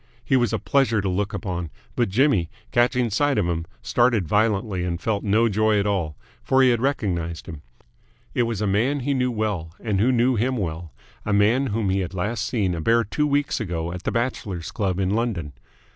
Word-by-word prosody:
He 135 - +2
was 120 -4 +2
a - - +1
pleasure 135 -6 +2
to 100 - -1
look 100 +2 -1
upon, 90 -5 -4 0.3
but 120 -4 +1
Jimmy, 105 - +2 0.2
catching 120 -1 +2
sight 145 +5 +1
of 105 - +2
him, 85 -1 -2 0.2
started 120 -5 +2
violently 105 -1 +1
and 85 -1 -2
felt 100 +2 -1
no 110 +3 +3
joy 110 0 +2
at 100 - 0
all; 90 -7 -1 0.2
for 135 0 +3
he 130 - +5
had 120 -1 0
recognised 90 -11 -1
him. 80 -3 -8 0.7
It - - +1
was 115 -3 -1
a - - +1
man 120 +9 +1
he 140 +3 0
knew 125 -1 +1
well 105 -8 -3
and 105 -4 -1
who 120 +6 +3
knew 125 0 +2
him 130 +4 0
well 85 -4 -4 0.3
a 105 - -1
man 110 +7 +3
whom 105 -3 0
he 95 - +1
had 95 0 -4
last 105 +6 -2
seen 100 -7 0
a 85 - -3
bare 115 +6 +3
two 150 +8 -1
weeks 145 -1 0
ago 85 -6 -3
at 90 - -6
the - - -2
Bachelors' 110 -8 -3
Club 95 -3 -1
in 95 -1 +1
London. 105 -10 -1
105 Hz, 210 wpm, -23 LUFS, 90-120 Hz, 0.7 s, he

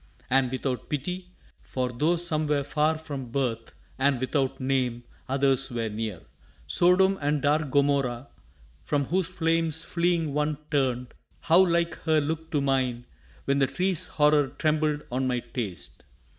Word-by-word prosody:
And 135 -1 +3
without 130 0 -3
pity! 180 +6 -4 0.3
for 125 -1 -3
tho' 150 +8 +1
some 160 -3 0
were 145 -1 +1
far 150 +2 +1
From 140 -6 -6
birth, 115 -3 -2 0.2
and 135 -1 +2
without 130 +1 -1
name, 130 -3 0 0.3
others 135 0 +2
were 115 -3 -2
near 105 -4 -4 0.4
Sodom 180 - +4
and 145 +1 +1
dark 150 +1 +1
Gomorrah 140 -2 +1 0.6
from 145 -2 0
whose 180 +4 0
flames 165 -2 0
Fleeing 170 -3 0
one 150 0 0
turned... 125 -3 0 0.3
how 170 +3 +5
like 170 -1 +1
her 160 -2 +2
look 160 +2 -3
to 145 - 0
mine 130 -3 0 0.4
When 140 0 +1
the 135 - +3
tree's 180 +5 -1
horror 150 -1 +3
trembled 155 0 0
on 130 +1 0
my 125 -1 0
taste! 110 -8 -6
145 Hz, 145 wpm, -27 LUFS, 130-160 Hz, 0.6 s, how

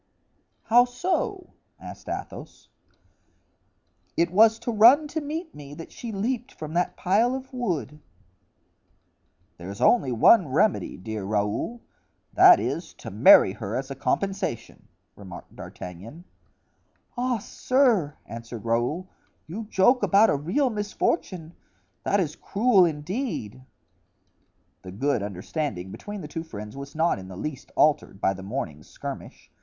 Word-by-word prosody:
"How 240 +2 +5
so?" 365 - -2 0.3
asked - - -10
Athos. - - -7 1.5
"It 170 0 +2
was 220 +3 +5
to 240 - -4
run 240 +8 +6
to 315 +1 -3
meet 315 +3 -5
me 145 0 -10
that 165 - -10
she 235 - -7
leaped 240 +5 -3
from 155 0 -7
that 175 +1 0
pile 225 +7 +2
of 265 0 -8
wood." 170 - -3 1.6
"There's 95 +4 -8
only 185 - +3
one 160 - +5
remedy, 160 +10 +1
dear 105 +2 -5
Raoul—that 105 - +2
is, - - -4
to - - -9
marry - - +7
her - - -5
as - - -4
a - - -4
compensation." 195 - -3 0.3
remarked 95 -3 -11
D'Artagnan. 100 - -10 0.9
"Ah, 250 -1 0
sir!" 220 - +1
answered 115 0 -8
Raoul, 120 +11 0 0.4
"you 210 +8 -6
joke 215 +5 +3
about 210 +3 +5
a - - +2
real 185 - 0
misfortune; 205 - -2 0.5
that 200 - +1
is 155 -5 -1
cruel, 205 -3 +3
indeed." 155 - -4 1.2
The 95 - -9
good 125 +4 0
understanding 100 - -4
between 205 - -7
the 150 - -7
two 165 - -5
friends 105 -8 -9
was 140 +1 -9
not 160 -8 +1
in 95 - -10
the 95 -1 -9
least 140 +4 -6
altered 150 -9 +2
by 95 - +1
the 95 - -9
morning's 95 - -6
skirmish. - - -9
170 Hz, 130 wpm, -25 LUFS, -, 1.6 s, marry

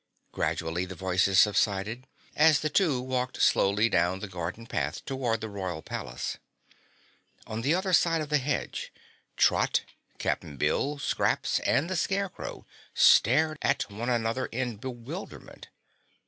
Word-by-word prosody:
Gradually 85 +2 -1
the 95 0 -8
voices 95 +1 +2
subsided, 105 +4 +2 0.3
as 155 -1 +5
the 155 - -1
two 155 -7 +2
walked 125 0 -3
slowly 105 +3 +3
down 90 -2 +1
the 105 - -6
garden 90 +4 -5
path 115 - -3
toward 125 -5 -1
the 110 - -3
Royal 95 -6 -5
Palace. - - -5 1.1
On 110 +1 -4
the 145 +7 +2
other 185 0 -1
side 165 -1 +4
of 155 -1 -4
the 150 -1 +3
hedge, 135 +1 -3 0.5
Trot, - - +3 0.3
Cap'n 70 - -3
Bill, 135 - 0
Scraps 140 - 0
and 150 - +1
the 185 - -2
Scarecrow 195 +1 -3 0.3
stared 155 +6 +5
at - - 0
one 115 +5 -4
another 115 +1 0
in 125 -2 -3
bewilderment. 130 - -8
120 Hz, 135 wpm, -28 LUFS, 95-145 Hz, 1.1 s, as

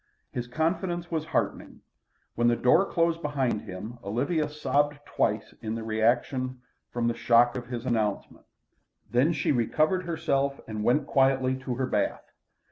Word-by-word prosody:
His 120 0 -4
confidence 175 +5 -1
was 160 -2 -1
heartening. - - -2 0.5
When 120 +1 +2
the 120 - +4
door 165 +12 +3
closed 165 -1 +1
behind 135 -8 0
him 105 +6 -8
Olivia 145 - 0
sobbed 145 0 0
twice 105 -5 -1
in 110 0 -3
the 115 - -4
reaction 120 +4 0 0.3
from 120 -1 -1
the 120 - +1
shock 120 +1 +4
of 120 -2 -5
his 120 -1 -5
announcement. 110 -5 -2 0.6
Then 130 +7 +3
she 155 - 0
recovered 155 - +1
herself 140 -4 0
and 110 -1 -4
went 135 +6 +3
quietly 135 -2 +2
to 130 -1 -4
her 130 +1 0
bath. 105 -5 -2
130 Hz, 150 wpm, -27 LUFS, 120-150 Hz, 0.6 s, the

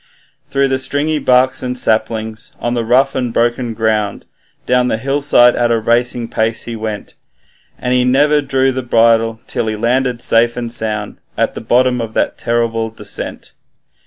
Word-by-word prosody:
Through 140 0 +1
the 130 0 0
stringy 145 +3 -1
barks 130 -1 +2
and 125 0 -3
saplings, 110 -1 -1
on 120 - -2
the 120 -1 -1
rough 130 +4 +2
and 125 -2 -2
broken 120 0 0
ground, 110 -2 -1 0.4
Down 125 0 +2
the 110 - 0
hillside 135 -1 +3
at 120 -1 +1
a 115 - +2
racing 120 +1 0
pace 110 0 -1
he 115 - -5
went; 110 -2 -6 0.6
And 125 - -2
he 125 0 +3
never 145 +4 +3
drew 135 -1 +1
the 130 0 -3
bridle 115 -1 +2
till 115 - -2
he 110 - -1
landed 125 +2 0
safe 115 +1 +2
and 120 -1 -4
sound, 110 -3 -3 0.2
At - - 0
the - - -7
bottom 125 +2 +2
of 110 -1 -6
that - - -1
terrible 115 -1 -1
descent. 105 -2 -6
120 Hz, 170 wpm, -16 LUFS, 115-130 Hz, 0.6 s, hillside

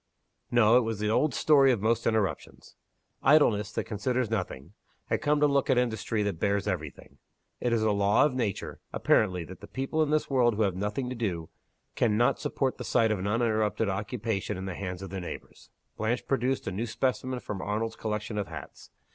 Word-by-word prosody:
No; 120 -1 +5
it - - +5
was 115 -2 -2
the 105 +1 0
old 145 +3 +2
story 140 -3 +5
of 120 - +1
most 115 +3 +1
interruptions. 105 -8 -2 0.5
Idleness 110 -9 +4
that - - -1
considers 120 +2 -1
nothing, 90 -6 -4 0.4
had - - 0
come 150 0 +2
to 150 - +4
look 140 -1 +2
at 130 - +4
Industry 115 -3 0
that 100 -5 -2
bears 100 0 0
every 85 -7 -1
thing. - - -18 0.4
It 120 - 0
is 115 -2 +2
a 110 - +3
law 100 +5 +4
of 150 - 0
nature, 115 -7 -3
apparently, 90 -5 +2
that 95 +3 -11
the - - -10
people 135 +4 -2
in 155 - +2
this 155 0 +1
world 120 -4 +3
who 110 - +2
have 100 -3 +1
nothing 105 +7 -2
to 130 - -4
do 90 -9 -3 0.4
can 110 -3 +1
not 120 +1 +3
support 140 -3 -1
the - - -4
sight 115 -2 +2
of 105 - 0
an 95 - -2
uninterrupted 110 -1 +1
occupation 105 0 -2
in 95 - -5
the 95 - -4
hands 90 0 -5
of 95 - -8
their 95 -1 -4
neighbors. 85 - -9 0.3
Blanche 110 +3 -1
produced 135 0 0
a - - -2
new 110 +6 -3
specimen 130 +2 -1
from 100 -5 -5
Arnold's 110 +3 -2
collection 105 0 -3
of 100 - -3
hats. - - -10
110 Hz, 205 wpm, -28 LUFS, 100-125 Hz, 0.5 s, No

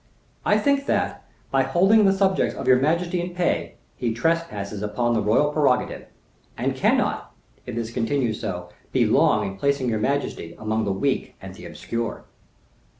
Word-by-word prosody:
I - - +3
think 280 -1 +1
that, - - -1 0.3
by 135 - +3
holding 195 +10 +4
the 195 - +5
subjects 195 -1 +1
of 135 - -5
your 130 -1 +6
majesty 170 +5 +1
in 175 0 -6
pay, 180 -1 -1 0.2
he 115 -2 -2
trespasses 115 -9 -1
upon 120 +3 0
the 110 - +1
royal 110 +8 +2
prerogative, 140 -5 +1 0.5
and - - -1
cannot, - - +1 0.4
if - - -5
this 115 -1 -3
continues 115 -1 -1
so, 90 -1 -4 0.2
be - - +3
long - - +3
in 95 0 -5
placing 140 +2 0
your 110 -2 0
majesty 105 -9 -2
among 110 0 -1
the 100 - 0
weak 130 +8 -1
and - - -9
the - - -10
obscure." 115 -1 -5
130 Hz, 165 wpm, -24 LUFS, 110-165 Hz, 0.5 s, your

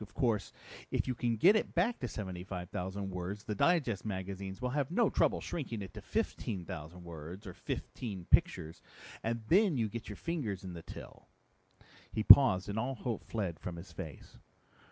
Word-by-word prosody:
Of 105 - -10
course 115 -5 +1 0.4
if - - 0
you 130 - +1
can 120 -1 0
get 185 - +6
it 220 - 0
back 200 +8 +2
to 125 - -2
75,000 95 -1 -4
words 90 +3 -4
the 105 - -3
digest 130 - +2
magazines 95 -1 -4
will 125 0 -1
have 140 -1 0
no 215 +5 +3
trouble - - +2
shrinking 120 -10 -4
it 95 - -9
to - - -8
15,000 90 -3 -3
words 85 +4 -8
or 95 - -7
fifteen 95 +1 -5
pictures, 80 +1 +3 0.4
and 115 +1 -1
you - - -17
then 195 -2 +5
get 115 0 -6
your 105 - -5
fingers 115 - -3
in 95 -2 -6
the 85 - -7
till." - - -11 0.8
He 110 - -1
paused 105 -8 +9
and 105 +2 -2
all 130 +4 -1
hope 115 -1 -3
fled 95 -8 -3
from 90 - -5
his 85 +3 -9
face. 80 -7 -9
100 Hz, 175 wpm, -33 LUFS, 90-125 Hz, 0.8 s, paused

